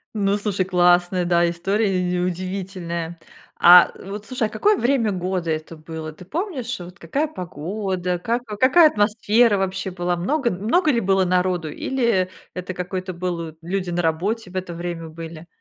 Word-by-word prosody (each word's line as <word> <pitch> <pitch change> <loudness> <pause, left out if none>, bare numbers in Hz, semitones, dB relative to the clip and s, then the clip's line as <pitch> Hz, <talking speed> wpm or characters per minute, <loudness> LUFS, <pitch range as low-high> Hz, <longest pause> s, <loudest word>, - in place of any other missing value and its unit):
Ну, 200 -1 +1
слушай, 200 -2 -1
классная, 180 0 +3
да, 175 0 +3
история, 195 +5 0
э 185 -1 +1 0.2
и 180 - 0
удивительная. 180 -2 -4 0.4
А 175 0 +8
вот 205 +2 -7
слушай, 245 -4 -1
какое 405 - +2
время 240 - +2
года 180 -2 -2
это 155 +1 -4
было? 160 0 -7
Ты 180 - -13
помнишь, 270 - -3
вот 180 0 -10
какая 275 - -1
погода, 180 - -3
как 235 +5 -2
какая 260 +10 +5
атмосфера 215 0 +3
вообще 190 0 -2
была? 175 0 -1
Много 240 - 0
много 235 - +2
ли 235 - +1
было 190 -2 +2
народу 180 -3 +1
или 235 - 0 0.2
это 180 +1 -5
какой-то 185 +1 -4
был 170 -2 -4
люди 185 +2 -3
на 175 0 0
работе 185 +6 -1
в 185 - -14
это 185 -2 -3
время 170 -1 -5
были? 165 +1 -9
185 Hz, 160 wpm, -22 LUFS, 175-215 Hz, 0.4 s, А